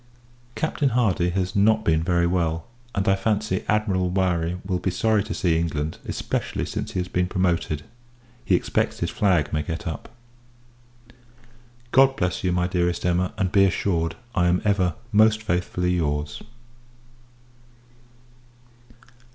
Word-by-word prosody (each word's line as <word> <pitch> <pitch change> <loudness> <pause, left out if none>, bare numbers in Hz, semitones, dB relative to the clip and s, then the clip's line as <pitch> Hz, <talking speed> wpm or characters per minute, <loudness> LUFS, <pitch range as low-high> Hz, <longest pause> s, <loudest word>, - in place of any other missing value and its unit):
Captain 150 -3 0
Hardy 105 -8 +1
has 95 0 -2
not 110 +2 +3
been 80 -1 +3
very 85 0 +1
well: 85 -2 0 0.3
and, 100 0 -1
I 95 - +5
fancy, 105 -1 -1
Admiral 100 -4 +1
Murray 90 -2 0
will 95 -2 0
not - - -9
be - - +1
sorry 110 +2 +1
to - - -4
see 85 -4 +1
England; 80 -2 -2
especially, - - -2
since - - -5
he - - -1
has 90 - -2
been 90 -1 0
promoted 85 -5 0 0.6
he - - +3
expects - - -1
his - - -1
flag 90 -8 +1
may 75 - +1
get 80 +6 -5
up. 80 - -5 1.8
God 135 +1 +5
bless 90 -6 -1
you, 90 - +1
my 90 0 +1
dearest 90 -1 -1
Emma; 90 +1 +1
and, 95 -2 0
be 100 -1 +5
assured, 85 -4 0 0.2
I 90 -4 +2
am 90 +1 +1
ever 95 -4 +2 0.2
most 110 0 +4
faithfully 90 -2 -1
your's. 75 -4 -1
90 Hz, 145 wpm, -24 LUFS, 85-100 Hz, 1.8 s, I